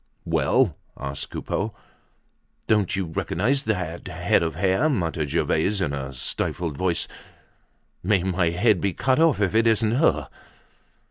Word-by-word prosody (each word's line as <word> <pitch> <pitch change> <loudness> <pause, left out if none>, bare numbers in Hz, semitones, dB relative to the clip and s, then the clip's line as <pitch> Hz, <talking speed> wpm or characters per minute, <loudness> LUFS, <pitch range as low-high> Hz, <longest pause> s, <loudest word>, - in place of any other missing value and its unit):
"Well?" 125 - +2 0.2
asked 70 0 -5
Coupeau. 105 +1 -3 0.9
"Don't 105 -4 +2
you 95 -1 -1
recognize 105 - 0
that 90 -6 -2
head 90 0 +1
of 80 -3 -2
hair?" 95 - +2
muttered 80 - -1
Gervaise 95 +9 +1
in 85 -7 -1
a 70 -1 -4
stifled 75 +5 -3
voice. 90 +2 0 0.9
"May 95 -1 +2
my 90 -2 +1
head 90 +3 +2
be 100 -2 0
cut 130 - +1
off 165 -6 +4
if 100 -2 +1
it 115 +1 +4
isn't 110 -1 +3
her." 115 - +2
95 Hz, 140 wpm, -24 LUFS, 80-110 Hz, 0.9 s, off